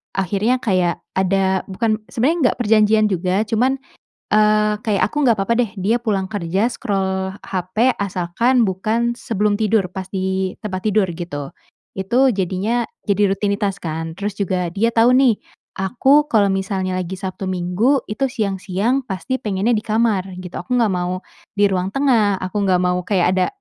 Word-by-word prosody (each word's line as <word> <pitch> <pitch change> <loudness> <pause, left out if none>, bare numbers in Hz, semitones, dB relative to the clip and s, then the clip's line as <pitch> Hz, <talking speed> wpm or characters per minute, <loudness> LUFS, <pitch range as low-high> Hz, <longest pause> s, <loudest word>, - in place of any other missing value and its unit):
akhirnya 200 +6 +1
kayak 185 -5 +1 0.2
ada, 190 0 +1
bukan, 215 +2 -1
sebenarnya 285 +9 +1
enggak - - -3
perjanjian 215 0 +4
juga, 185 +3 +1
cuman, 245 +5 +1 0.6
eee, 210 0 +3
kayak 205 -4 +1
aku - - -16
enggak 235 -3 +4
apa-apa 195 +4 +1
deh 215 - -8
dia 215 +6 +2
pulang 200 -5 -1
kerja 195 +2 0
scroll 190 -4 -2
hape, 190 +7 0
asalkan 200 +6 +1
bukan 225 +6 -1
sebelum 210 -3 0
tidur, 215 -3 +1
pas 190 0 -5
di 190 0 -1
tempat 190 -2 -4
tidur, 210 -3 +2
gitu. 145 -5 -5 0.5
Itu 245 +8 +3
jadinya 200 +4 -1 0.2
jadi 205 +1 +3
rutinitas 200 0 -1
kan. 160 0 -4
Terus 200 +3 -4
juga 185 -3 -1
dia 225 +6 0
tahu 230 +2 +5
nih, 255 -4 +5 0.5
aku 270 +9 +3
kalau 210 -3 +4
misalnya 190 -1 -2
lagi 185 +1 -5
Sabtu 190 0 -5
Minggu 185 +9 +1
itu 265 +6 -1
siang-siang 205 +1 -1
pasti 250 +4 -4
pengennya 210 +3 0
di 210 - 0
kamar, 215 -4 +1
gitu. 180 -1 -9
Aku 250 +8 -2
enggak 225 -4 +2
mau 180 +1 -2 0.3
di 205 - +5
ruang 185 -1 0
tengah, 225 -6 +2
aku 185 +3 -3
enggak 180 -1 +3
mau 180 0 +1
kayak 180 -1 +1
ada 185 - +2
200 Hz, 160 wpm, -20 LUFS, 185-225 Hz, 0.6 s, tahu